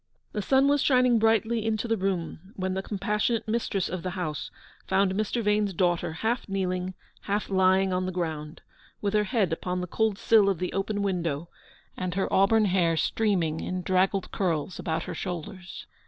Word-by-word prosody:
The 210 - -2
sun 265 +6 +3
was 285 0 +3
shining 250 -4 +4
brightly 225 +1 +2
into 220 +1 -1
the 225 - +2
room 190 -1 -3
when 185 0 -2
the 190 - -1
compassionate 210 +4 -1
mistress 215 -4 -1
of 185 0 -4
the 185 - -3
house 155 -5 -3 0.4
found 190 0 +2
Mr. 215 +3 -1
Vane's 210 -2 +1
daughter 175 -1 +1
half 220 +8 -2
kneeling, 185 -1 -2 0.3
half 205 0 -1
lying 190 0 +3
on 185 0 0
the - - -2
ground, 160 -3 -4 0.4
with 205 0 -1
her 210 0 +3
head 205 -7 +1
upon 180 +2 -2
the 180 - -2
cold 215 +3 0
sill 210 -2 +4
of 195 - 0
the 180 +2 -3
open 200 +1 -1
window, 170 -5 -2 0.5
and 180 -1 -3
her 195 - +1
auburn 215 +3 +4
hair 175 -4 +2
streaming 170 -5 +1
in 185 0 -3
draggled 190 +1 +1
curls 175 -3 -1
about 160 0 -2
her - - -5
shoulders. 180 0 -6
190 Hz, 180 wpm, -27 LUFS, 180-210 Hz, 0.5 s, shining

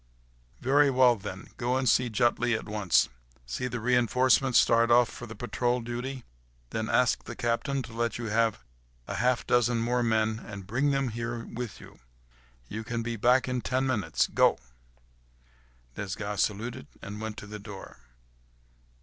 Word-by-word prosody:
"Very 140 +2 +4
well, 125 -2 +5
then. 95 -2 -8
Go 125 +1 0
and 130 -1 0
see 125 +2 +3
Jutley 120 +2 +2
at - - -8
once. 105 -4 +2 0.4
See 65 - -3
the 125 -1 -4
reinforcements 125 +1 +3
start 115 0 +4
off 120 0 +6
for 120 - -9
the 115 - -9
patrol 120 +2 -1
duty, 120 +2 -5 0.5
then - - -2
ask - - +2
the - - -7
captain 125 +3 -1
to 115 - -10
let 115 0 -1
you 120 - -5
have 110 - +1 0.4
half 125 +2 +1
a - - -17
dozen 120 0 +2
more 120 +2 +1
men 110 -1 +1
and 100 -4 -9
bring 130 +9 +1
them 135 -2 +1
here 115 +1 -4
with 120 -5 -6
you. - - -14 0.7
You 110 - -5
can 115 +1 -3
be 120 0 -3
back 125 +4 +3
in 125 -1 -1
ten 130 +2 0
minutes. 120 -7 +1
Go—" - - +3 1.4
Desgas 100 +1 -3
saluted 115 +5 -2 0.2
and 105 +2 -7
went 110 -1 -5
to - - -8
the 105 +1 -8
door. 100 - -10
120 Hz, 165 wpm, -28 LUFS, 110-125 Hz, 1.4 s, off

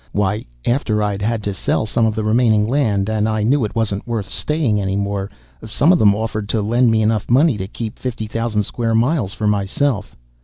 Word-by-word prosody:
Why, 105 +1 0 0.2
after 110 -4 +1
I'd 100 -1 -2
had 110 0 -1
to 100 - -2
sell 95 - -1
some 110 +1 +1
of 110 - -1
the 110 - -2
remaining 110 -1 +3
land, 110 -7 +1
and 110 0 0
I 110 -1 0
knew 130 +4 +2
it 105 - -4
wasn't 110 -1 -1
worth 110 -4 -3
staying, 145 -10 -1
any 95 0 -1
more, 100 0 -2 0.4
some 145 - +3
of 175 - +2
them 100 -2 +5
offered 110 -1 -3
to 110 - +1
lend 120 +3 +3
me 110 -1 +2
enough 110 -1 0
money 135 +3 +4
to 95 - -4
keep 110 +1 -6
fifty 120 -4 -4
thousand 110 -1 -1
square 115 +2 -2
miles 115 - +1
for 110 - -3
myself." 105 +3 0
110 Hz, 215 wpm, -19 LUFS, 105-120 Hz, 0.4 s, them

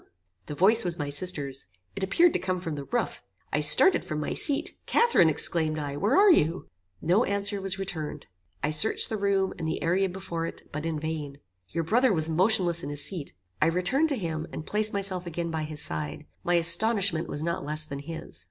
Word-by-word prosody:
The 150 - -6
voice 210 +8 +5
was 175 -2 +1
my 145 -1 -4
sister's. 145 - -1 0.3
It - - -6
appeared 330 - +3
to - - +1
come 185 -1 -3
from 165 -3 -5
the 140 -1 -6
roof. 240 - -3 0.3
I 150 - +1
started 150 - +5
from 155 -1 -5
my 150 - -3
seat. 285 -2 0
Catharine, 470 - +3
exclaimed 155 +1 +1
I, 145 -2 -4
where 205 - +1
are 400 0 +6
you? 165 - +1 0.4
No 185 +8 +3
answer 200 -1 0
was 195 0 -2
returned. 180 -6 -6 0.4
I 145 - 0
searched 155 +9 +4
the 220 - -3
room, 195 -1 0
and 160 - -3
the 160 - -3
area 185 +3 +1
before 170 -3 -5
it, - - -10
but 150 +2 -4
in 160 -2 -3
vain. 150 -3 -5 0.3
Your 165 - -3
brother 240 +9 +2
was 160 -3 +1
motionless 180 -1 +4
in - - -6
his 145 0 -2
seat. 170 -7 -4 0.3
I - - +4
returned 180 - +1
to 285 - +2
him, 160 -5 -4
and 155 - -7
placed 215 +1 +1
myself 190 -3 -2
again 170 0 -4
by 160 -1 -3
his 150 -1 -4
side. 75 -1 -5 0.2
My 175 - +1
astonishment 175 +1 +3
was 145 - -2
not 170 +1 -3
less 155 +1 -2
than 140 -2 -7
his." 160 - -7
170 Hz, 210 wpm, -26 LUFS, 155-195 Hz, 0.4 s, are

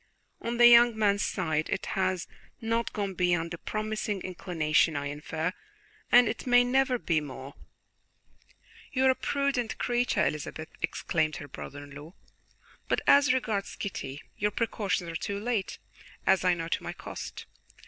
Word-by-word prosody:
On 235 +1 -3
the 240 - +7
young 235 -1 +7
man's 205 -1 +2
side 155 -1 -1
it - - -2
has 185 -2 -1 0.3
not 230 0 -1
gone 200 -2 -3
beyond 175 -2 0
a 170 - -6
promising 215 -1 -3
inclination, 165 -4 +1
I 145 0 -2
infer, 155 +4 -3 0.6
and 245 -1 +7
it 225 - -4
may 245 0 +6
never 260 +1 +2
be 165 -8 0
more." 135 -1 -8 1.4
"You 265 -1 +2
are 260 - +7
a - - -1
prudent 275 -5 -1
creature, 245 0 +1
Elizabeth," 155 +1 -4
exclaimed 155 -2 0
her 145 - -7
brother 145 +1 -8
in 145 - -13
law; 150 +6 -11 0.7
"but - - +1
as 285 0 +6
regards 220 -6 -1
Kitty, 140 -8 -5
your 210 - +1
precautions 205 -4 -1
are 165 - -6
too 200 +3 -3
late, 220 -3 -2 0.5
as 190 0 +4
I 180 -1 +4
know 165 -1 -4
to - - -1
my - - -5
cost. - - -8
195 Hz, 160 wpm, -29 LUFS, 160-235 Hz, 1.4 s, the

